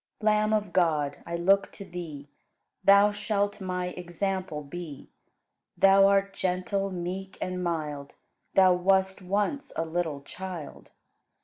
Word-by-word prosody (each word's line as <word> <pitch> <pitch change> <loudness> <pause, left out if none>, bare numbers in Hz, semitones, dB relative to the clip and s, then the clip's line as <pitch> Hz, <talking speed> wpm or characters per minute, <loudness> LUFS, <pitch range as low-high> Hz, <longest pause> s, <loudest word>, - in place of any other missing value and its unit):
104. 215 0 +4
Lamb 215 0 +1 0.2
of 175 - -18
God, 155 -6 +1
I 170 - -3
look 195 +3 +3
to 200 - -9
Thee; 165 -6 -7 0.6
Thou 200 +1 +6
shalt 205 0 -1
my 180 -1 -2
example 180 -2 -3
be; 150 -1 -8 0.7
Thou 195 0 +6
art 195 0 +2
gentle, 190 +2 -1
meek, 185 +1 -5
and 185 0 -3
mild, 150 -5 -3 0.4
Thou 185 -1 +6
wast 190 +2 +2
once 205 +10 -1
a 165 - -1
little 160 -3 -2
child. 175 0 -8
185 Hz, 130 wpm, -28 LUFS, 170-195 Hz, 0.7 s, Thou